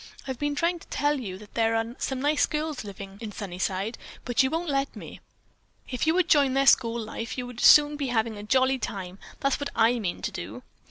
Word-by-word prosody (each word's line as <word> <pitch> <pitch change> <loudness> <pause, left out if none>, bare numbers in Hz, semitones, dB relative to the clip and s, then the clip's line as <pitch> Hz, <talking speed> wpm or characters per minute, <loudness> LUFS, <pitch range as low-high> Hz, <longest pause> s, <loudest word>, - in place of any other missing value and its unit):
"I've 260 -2 -4
been 290 0 -1
trying 340 +3 0
to - - -16
tell 290 0 0
you 190 -7 -6
that 205 +1 -15
there 225 0 +2
are 225 +1 -2
some 265 0 -2
nice 295 +1 +3
girls 305 -3 -3
living 200 -1 -9
in 220 -2 -5
Sunnyside, 195 +2 -3 0.3
but 245 0 +2
you 265 - +2
won't 330 +3 -2
let 275 -1 -1
me. - - -9 0.7
If 250 +4 -1
you 320 - +4
would 365 -2 +2
join 280 -4 +4
their 275 0 +3
school 235 -3 +4
life, 225 +2 -5
you 250 - -3
would 245 -1 -9
soon 295 0 +7
be 280 -2 -2
having 225 -2 0
a 205 - -7
jolly 260 +4 +2
time. 190 -3 -5 0.2
That's 275 0 +1
what 285 -1 -3
I 235 +2 +3
mean 185 -5 -3
to - - -2
do." 105 +8 -7
245 Hz, 225 wpm, -26 LUFS, 215-285 Hz, 0.7 s, soon